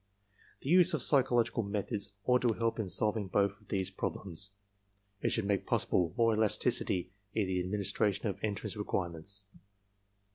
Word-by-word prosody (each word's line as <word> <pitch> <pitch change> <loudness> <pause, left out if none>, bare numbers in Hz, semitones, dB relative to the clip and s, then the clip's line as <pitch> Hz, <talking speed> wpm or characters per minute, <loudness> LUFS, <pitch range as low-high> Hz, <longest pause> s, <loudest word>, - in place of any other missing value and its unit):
"The 135 - -5
use 180 +1 +6
of - - 0
psychological 125 -4 +3
methods 100 -1 -2
ought 125 0 +4
to 120 -3 +2
help 115 0 -1
in 105 -4 -2
solving 105 0 +2
both 100 +1 +2
of - - -23
these 95 -1 -1
problems. 95 0 -3 0.7
It - - +1
should 115 - 0
make 100 -1 0
possible 85 -3 +1
more 115 -1 +4
elasticity 95 -4 +1 0.2
in 110 -2 +2
the 95 -1 -1
administration 100 +2 0
of 100 -2 -2
entrance 105 -1 -2
requirements. 95 -1 -3
100 Hz, 150 wpm, -32 LUFS, 95-115 Hz, 0.7 s, use